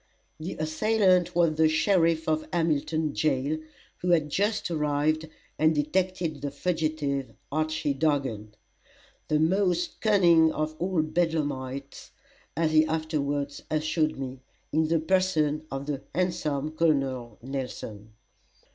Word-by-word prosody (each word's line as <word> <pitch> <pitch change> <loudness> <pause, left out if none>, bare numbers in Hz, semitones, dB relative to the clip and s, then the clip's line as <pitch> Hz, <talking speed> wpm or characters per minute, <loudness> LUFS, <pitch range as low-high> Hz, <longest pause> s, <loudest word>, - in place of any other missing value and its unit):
The 165 +4 -4
assailant 185 +3 +2
was 170 -2 +3
the 160 0 +5
sheriff 165 -1 +2
of 155 0 0
Hamilton 155 -2 0
jail, 150 +1 0 0.4
who 180 - -3
had 155 -4 +3
just 205 0 0
arrived 155 0 0 0.3
and 155 0 +4
detected 165 0 -1
the 145 - -2
fugitive, 150 -3 -2 0.2
Archy 155 -1 0
Dargan 135 -8 -1 0.7
the 155 - +2
most 180 +1 +1
cunning 170 -7 +5
of 155 0 -2
all 180 -2 +1
bedlamites, 145 -5 -2 0.5
as 160 -1 +2
he 155 0 +6
afterwards 145 -3 -2
assured 155 0 0
me 130 -1 -5 0.3
in 160 +1 +3
the 165 0 +2
person 155 -4 +1
of 135 +1 -4
the 145 -2 -3
handsome 155 -5 -1
Col. 135 -8 0
Nelson. 120 -5 -6
155 Hz, 120 wpm, -27 LUFS, 145-165 Hz, 0.7 s, he